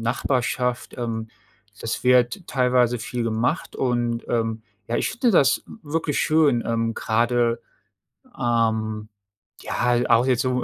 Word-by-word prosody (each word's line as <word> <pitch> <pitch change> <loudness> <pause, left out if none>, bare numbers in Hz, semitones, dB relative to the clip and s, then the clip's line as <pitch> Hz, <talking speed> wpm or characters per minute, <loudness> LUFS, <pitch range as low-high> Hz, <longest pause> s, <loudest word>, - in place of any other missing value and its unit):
Nachbarschaft, 125 +1 -1
ähm, 115 -2 -3 0.5
das 115 - -3
wird 125 +9 +3
teilweise 125 -2 +2
viel 120 +2 -4
gemacht 115 +8 -1
und, 120 -2 -1
ähm, 115 -1 -1 0.3
ja, 120 - 0
ich - - 0
finde 245 0 +1
das 140 - +4
w - - -12 0.2
wirklich 160 -3 0
schön, 150 -6 +3
ähm, 115 0 0
grade, 115 +1 +1 0.7
ähm, 110 -2 0 0.5
ja, 125 0 0
auch 120 +1 +5
jetzt 125 -2 +2
so 125 -1 0
120 Hz, 130 wpm, -23 LUFS, 115-125 Hz, 0.7 s, auch